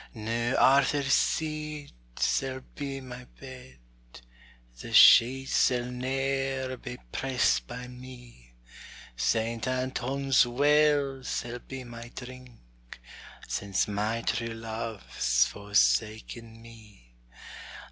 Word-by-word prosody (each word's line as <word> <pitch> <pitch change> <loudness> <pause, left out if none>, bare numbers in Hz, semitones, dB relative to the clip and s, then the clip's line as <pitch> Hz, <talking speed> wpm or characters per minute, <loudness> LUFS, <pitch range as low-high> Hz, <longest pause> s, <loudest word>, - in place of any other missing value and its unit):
Noo 115 +3 -2
Arthur's 140 0 +4
Seat 155 -2 -1 0.2
sall 130 -1 0
be 140 -2 -5
my 125 -1 -10
bed, 130 -1 -12 1.0
The - - -8
sheets 130 +3 +6
sall 125 -1 +3
ne'er 135 +1 -2
be 125 0 -8
pressed 130 -1 0
by 125 0 -7
me; 125 - -13 0.6
Saint 110 - -1
Anton's 130 +1 +1
well 145 +1 +2
sall 120 -1 -4
be 135 0 -8
my 120 -1 -10
drink; 120 - -12 0.5
Since 100 -2 -1
my 105 +3 -2
true 115 -1 -2
love's 110 - -1
forsaken 105 - -1
me. 105 - -17
125 Hz, 95 wpm, -28 LUFS, 115-135 Hz, 1.0 s, sheets